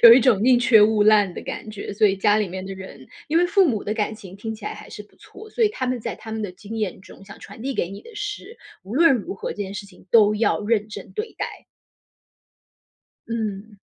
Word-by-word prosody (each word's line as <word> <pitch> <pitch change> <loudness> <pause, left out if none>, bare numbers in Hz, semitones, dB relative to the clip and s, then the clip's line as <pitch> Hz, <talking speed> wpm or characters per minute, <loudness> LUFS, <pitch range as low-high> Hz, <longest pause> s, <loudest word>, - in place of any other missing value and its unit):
有 230 - +12
一 240 - +9
种 230 -5 +3
宁 250 0 +5
缺 230 -3 +6
勿 215 -1 +4
烂 205 -3 +5
的 - - -7
感 215 - -6
觉， 205 -1 -6
所 215 +2 +1
以 195 - +1
家 205 +2 +3
里 210 -2 0
面 185 +1 -6
的 195 - -6
人 190 -8 -11 0.2
因 325 +2 +3
为 355 - +4
父 390 +1 +4
母 220 -6 -1
的 210 - -2
感 215 -1 -1
情 195 -4 -11
听 220 +2 -5
起 215 -1 -10
来 - - -4
还 - - -12
是 210 - -8
不 205 - -27
错， 435 - -13
所 470 - -1
以 435 - +6
他 265 -11 -4
们 250 -1 -1
在 - - -5
他 220 - -9
们 220 0 -3
的 205 - -3
经 205 +5 -9
验 210 -5 -3
中 195 0 -15
想 200 - -12
传 225 - -11
递 270 +1 -2
给 175 - -1
你 200 - -9
的 470 - -13
是， 415 +2 -6 0.2
无 195 +4 -10
论 330 -2 +6
如 210 -4 -4
何， - - -5
这 - - -8
件 195 -1 -4
事 200 0 -6
情 200 - -18
都 215 -2 +6
要 220 0 +1
认 215 0 +1
真 210 - -9
对 435 +1 -4
待。 - - -1 1.8
嗯。 215 -2 -4
215 Hz, 275 characters per minute, -23 LUFS, 200-245 Hz, 1.8 s, 有